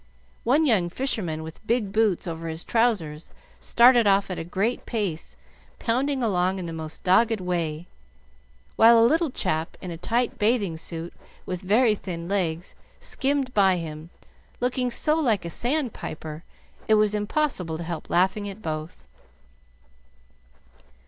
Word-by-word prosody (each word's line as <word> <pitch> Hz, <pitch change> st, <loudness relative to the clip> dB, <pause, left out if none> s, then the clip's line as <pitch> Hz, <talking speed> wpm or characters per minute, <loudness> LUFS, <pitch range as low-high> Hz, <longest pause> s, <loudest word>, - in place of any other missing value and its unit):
One 285 Hz, +7 st, +3 dB
young 200 Hz, -10 st, +3 dB
fisherman 175 Hz, -, -2 dB
with 160 Hz, +7 st, -11 dB
big 230 Hz, -4 st, 0 dB
boots 215 Hz, -3 st, +1 dB
over 165 Hz, -1 st, -5 dB
his 160 Hz, +1 st, -4 dB
trousers 195 Hz, -10 st, 0 dB, 0.3 s
started 240 Hz, -1 st, +5 dB
off 195 Hz, -1 st, +3 dB
at 185 Hz, -, -4 dB
a -, -, -3 dB
great 195 Hz, +8 st, -2 dB
pace, 175 Hz, -, -3 dB, 0.4 s
pounding 260 Hz, +3 st, 0 dB
along 185 Hz, -3 st, +1 dB
in 185 Hz, -, -5 dB
the 165 Hz, -, -5 dB
most 160 Hz, -1 st, -6 dB
dogged 220 Hz, +4 st, +3 dB
way, 170 Hz, -3 st, -2 dB, 0.9 s
while 230 Hz, +1 st, +7 dB
a 225 Hz, -, +6 dB
little 320 Hz, +5 st, +2 dB
chap 160 Hz, -9 st, -2 dB
in 180 Hz, -, -7 dB
a 165 Hz, -, -7 dB
tight 235 Hz, +6 st, -1 dB
bathing 210 Hz, -5 st, +1 dB
suit 165 Hz, +1 st, -5 dB, 0.3 s
with 180 Hz, -1 st, -4 dB
very 215 Hz, +4 st, +3 dB
thin 170 Hz, -4 st, -6 dB
legs 175 Hz, -3 st, -2 dB, 0.3 s
skimmed 270 Hz, -2 st, -1 dB
by 190 Hz, -3 st, +4 dB
him, 160 Hz, -1 st, -7 dB, 0.5 s
looking 250 Hz, 0 st, 0 dB
so 300 Hz, +5 st, +2 dB
like 225 Hz, -, +1 dB
a 170 Hz, -, -5 dB
sand 255 Hz, -, -1 dB
piper 155 Hz, 0 st, -7 dB, 0.4 s
it 220 Hz, -, +5 dB
was 210 Hz, -1 st, +3 dB
impossible 210 Hz, -, -1 dB
to 170 Hz, -, -5 dB
help 170 Hz, -1 st, -6 dB
laughing 190 Hz, +3 st, +1 dB
at 200 Hz, +2 st, -10 dB
both. 155 Hz, 0 st, -5 dB
195 Hz, 150 wpm, -25 LUFS, 165-235 Hz, 0.9 s, while